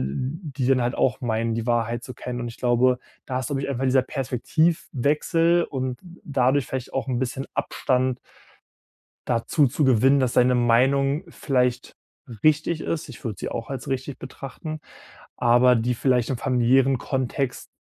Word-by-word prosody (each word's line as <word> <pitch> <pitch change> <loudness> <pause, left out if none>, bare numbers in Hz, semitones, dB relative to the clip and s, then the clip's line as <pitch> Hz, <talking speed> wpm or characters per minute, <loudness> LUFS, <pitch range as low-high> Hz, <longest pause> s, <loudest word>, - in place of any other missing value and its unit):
die 130 - -3
dann 130 -1 +3
halt 120 +1 -1
auch 120 - +1
meinen, 115 -1 0
die 115 0 -2
Wahrheit 120 -1 0
zu 125 - -7
kennen. 125 -1 -5
Und 120 - -3
ich 115 - -11
glaube, 125 +1 +3 0.3
da 130 -1 -2
ist, 130 - -4
glaube 140 -1 -2
ich, - - -3
einfach 135 -1 -2
dieser 130 0 +3
Perspektivwechsel 155 +4 +1
und 130 -2 -3 0.3
dadurch 135 -2 +1
vielleicht 130 -2 -5
auch 135 - -1
'n 125 -2 0
bisschen 130 +1 -3
Abstand 130 0 0 1.1
dazu 125 +5 +2
zu 145 +4 0
gewinnen, 130 +2 +4
dass 130 -2 +1
deine 125 0 +4
Meinung 135 +5 +3
vielleicht 125 -5 -1 0.5
richtig 155 +1 +2
ist. 155 -3 -3
ich 120 - -12
würd 110 -3 -4
sie - - -4
auch 115 -1 -5
als 135 -3 -6
richtig 135 +1 -3
betrachten. 140 +4 -7 0.6
Aber 120 0 +5
die 120 +2 0
vielleicht 125 -1 +1
im 130 - -1
familiären 130 +2 +3
Kontext 130 0 -2
130 Hz, 160 wpm, -24 LUFS, 120-140 Hz, 1.1 s, Aber